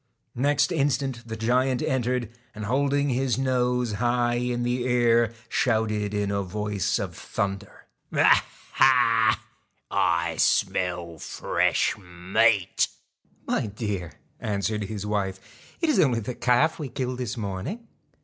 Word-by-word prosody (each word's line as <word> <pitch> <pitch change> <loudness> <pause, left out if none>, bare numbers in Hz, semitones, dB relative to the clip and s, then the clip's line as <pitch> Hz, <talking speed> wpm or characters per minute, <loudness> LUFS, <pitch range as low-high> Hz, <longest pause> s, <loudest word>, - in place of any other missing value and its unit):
Next 145 +4 +2
instant 135 -5 -1
the 110 - -4
giant 125 +3 +1
entered, 125 -2 -1 0.2
and 110 0 -5
holding 140 +4 +1
his 130 -1 0
nose 125 -2 +1
high 120 +2 +1
in 120 0 -1
the 120 0 0
air, 120 -2 +3 0.2
shouted 110 -4 0
in 100 -1 0
a 100 0 0
voice 105 0 -1
of - - -4
thunder: 100 -1 -4 0.2
1 - - +2
Ha! - - +5 0.3
Ha! 115 -4 +4 0.5
I 85 -1 +1
smell 90 -3 0
fresh - - 0
meat.' 95 +3 +1 0.6
'My - - 0
dear,' 100 -5 -4 0.3
answered 105 0 -2
his 105 0 -5
wife, 100 -2 -1 0.4
'it 330 - +2
is 305 - +3
only 125 -6 +3
the 115 +3 -4
calf 125 +8 +2
we 145 -4 -4
killed 125 0 -3
this 120 -1 -3
morning.' 115 - -5
115 Hz, 130 wpm, -25 LUFS, 100-125 Hz, 0.6 s, Ha